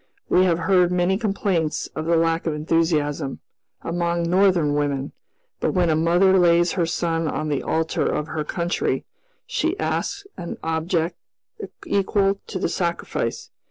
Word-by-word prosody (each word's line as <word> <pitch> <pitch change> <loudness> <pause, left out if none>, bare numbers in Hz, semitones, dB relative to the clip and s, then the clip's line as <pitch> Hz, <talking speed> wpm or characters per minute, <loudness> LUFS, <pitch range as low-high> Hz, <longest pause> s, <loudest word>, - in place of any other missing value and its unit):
We 185 - +4
have 170 -3 +2
heard 180 0 +3
many 180 +1 +2
complaints 195 -6 -1
of 155 - -3
the 170 - +3
lack 165 0 +1
of 155 - 0
enthusiasm, 150 -3 0 0.4
among 170 0 -1
Northern 180 -4 +3
women; 145 -2 -1 0.5
but - - -1
when 175 -3 +3
a - - +3
mother 175 +4 +4
lays 175 -1 +4
her 170 -3 0
son 165 -1 -1
on 155 0 -2
the 145 -2 0
altar 160 0 0
of 150 - -1
her 155 -1 -2
country, 170 +3 -1 0.4
she 370 -6 -1
asks 400 0 -2
an 170 - -6
object 165 +1 -1 0.7
equal 195 0 +1
to 195 - -4
the 185 - 0
sacrifice. 170 -2 -3
170 Hz, 150 wpm, -23 LUFS, 160-185 Hz, 0.7 s, We